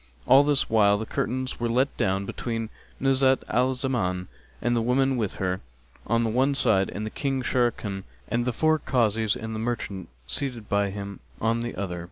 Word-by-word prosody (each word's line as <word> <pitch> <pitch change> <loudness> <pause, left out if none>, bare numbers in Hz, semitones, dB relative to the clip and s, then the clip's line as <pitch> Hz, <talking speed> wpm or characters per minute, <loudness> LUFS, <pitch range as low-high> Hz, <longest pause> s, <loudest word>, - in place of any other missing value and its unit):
All 135 +2 +7
this 145 -2 +2
while 100 -2 +4
the 110 - -4
curtains 130 +3 -2
were 120 0 0
let 130 +4 +1
down 95 +1 0
between 115 +1 -4 0.3
Nuzhat 135 0 +3
al 125 +3 +2
Zaman 95 -9 -1 0.3
and 120 0 +1
the 115 - +2
women 135 +3 +2
with 110 -6 -2
her, 95 -1 -2 0.5
on 115 +2 +2
the 115 - +1
one 135 +4 +2
side, 95 -8 +3
and 110 +1 -5
King 135 -2 -1
Sharrkan 115 -6 0 0.2
and 120 0 0
the 125 - +1
four 155 +6 +2
Kazis 110 -5 +1
and 110 -2 -5
the 110 - -3
merchant 110 -5 -3 0.2
seated 120 - -2
by 100 0 +1
him 100 0 -6 0.2
on 115 +1 +1
the 120 0 -4
other. 90 -3 -3
115 Hz, 185 wpm, -26 LUFS, 100-130 Hz, 0.5 s, All